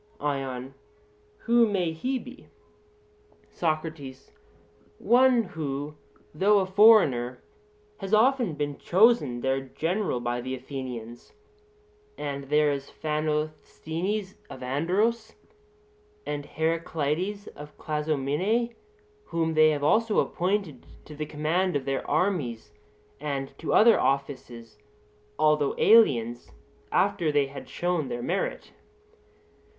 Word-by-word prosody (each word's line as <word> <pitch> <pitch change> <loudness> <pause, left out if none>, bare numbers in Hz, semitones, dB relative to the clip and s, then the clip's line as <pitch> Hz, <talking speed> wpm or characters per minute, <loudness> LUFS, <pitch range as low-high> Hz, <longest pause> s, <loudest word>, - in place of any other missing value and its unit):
ION: 135 -2 -3 0.7
Who 235 0 +5
may 185 -5 0
he 255 +12 -2
be? 255 +3 -11 1.0
SOCRATES: 155 -5 -4 0.7
One 250 - +4
who, 150 -5 -5 0.4
though 200 +7 +3
a 195 - +2
foreigner, 185 - +4 0.5
has 195 - -7
often 230 - +3
been 145 -1 -3
chosen 190 - +3
their 135 +1 0
general 165 - -2
by 120 0 -2
the 130 +1 -4
Athenians: 125 -3 -8 0.8
and 140 -1 -4
there 150 +1 +3
is 140 -1 -4
Phanosthenes 155 +5 -3
of 130 - -9
Andros, 200 - 0 0.9
and 145 -1 -4
Heraclides 165 +4 -2
of 150 +1 -12
Clazomenae, 155 - -1 0.5
whom 165 -1 -1
they 155 0 +6
have 145 -2 -1
also 220 +8 +2
appointed 185 -3 -1 0.2
to 155 - -11
the 150 0 -5
command 160 +5 0
of 140 -2 -1
their 135 -1 -3
armies 125 - -1 0.5
and 135 -2 -4
to 165 - -3
other 230 0 +6
offices, 125 -5 -3 0.6
although 150 -2 +2
aliens, 120 - +4 0.4
after 160 -3 +1
they 145 -1 +2
had 135 +1 -10
shown 175 -5 -1
their 120 -1 -5
merit. - - -3
155 Hz, 105 wpm, -26 LUFS, 135-195 Hz, 1.0 s, they